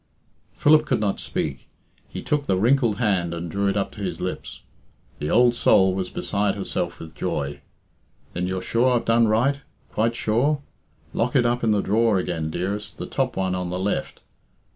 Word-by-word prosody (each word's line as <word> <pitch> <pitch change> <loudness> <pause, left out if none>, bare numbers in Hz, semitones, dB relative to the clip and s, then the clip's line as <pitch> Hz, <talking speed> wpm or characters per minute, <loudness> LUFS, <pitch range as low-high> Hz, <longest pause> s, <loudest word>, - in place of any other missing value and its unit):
Philip 155 +1 +4
could - - +1
not 100 -2 0
speak. - - -3 0.4
He - - -7
took 145 -1 -1
the 95 - +2
wrinkled 120 +1 +3
hand 95 -7 0
and 85 0 -5
drew 100 0 0
it 100 - +1
up 100 - -1
to - - -10
his - - -3
lips. - - -5 0.6
The 75 - -2
old 120 +1 +5
soul 95 -5 +4
was 95 -1 -2
beside 100 0 -1
herself 100 - -3
with 80 -1 -9
joy. 70 -1 -3 0.7
"Then 90 +1 -2
you're 95 0 -3
sure 125 +2 +2
I've 120 - 0
done 115 0 +4
right? 130 +7 +2 0.3
Quite 115 +2 +1
sure? 135 +7 +1 0.5
Lock 125 +3 0
it 125 -3 +4
up 120 +1 +1
in 115 - +2
the 105 -2 +3
drawer 110 +1 +3
again, 85 -4 -2
dearest 100 +6 -4
The - - -5
top 130 -5 -2
one 95 -1 0
on 90 -1 -2
the 90 - -3
left. 95 +2 -2
105 Hz, 185 wpm, -24 LUFS, 95-120 Hz, 0.7 s, old